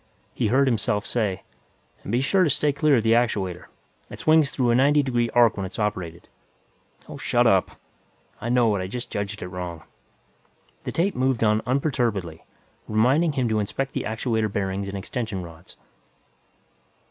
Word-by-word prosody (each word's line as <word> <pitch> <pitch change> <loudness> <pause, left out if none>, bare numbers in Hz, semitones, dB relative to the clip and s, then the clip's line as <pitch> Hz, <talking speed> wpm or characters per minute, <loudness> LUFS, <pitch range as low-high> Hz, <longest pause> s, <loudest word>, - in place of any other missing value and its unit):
He - - 0
heard 135 +5 +3
himself 105 -3 0
say, 105 -6 -1 0.6
"And - - -7
be 120 +2 +2
sure 185 +7 +3
to 165 - +2
stay 145 +2 +1
clear 145 0 +3
of 115 - 0
the 115 0 +3
actuator. 100 -7 0 0.4
It - - -9
swings 155 -2 +4
through 125 -4 +1
a - - +3
ninety 145 +3 +4
degree 120 -3 0
arc 120 -3 +5
when 95 - -2
it's 95 - -10
operated." 95 -6 -3 0.8
"Oh, - - -8
shut - - +1
up! - - +2 0.6
I 120 - -3
know 120 -3 +3
it; - - -1
I 95 - -3
just 120 +5 -6
judged 100 +1 -4
it - - -5
wrong." 90 -3 -6 1.0
The - - -3
tape 190 +4 0
moved 130 -2 0
on 105 0 +3
unperturbedly, 120 - -1 0.5
reminding 135 +9 +2
him 130 -4 0
to 110 -1 +1
inspect 135 +6 -3
the - - -3
actuator 110 -1 -1
bearings 100 0 -2
and 100 - -5
extension 100 -1 -4
rods. 85 0 -13
115 Hz, 170 wpm, -24 LUFS, 100-130 Hz, 1.0 s, arc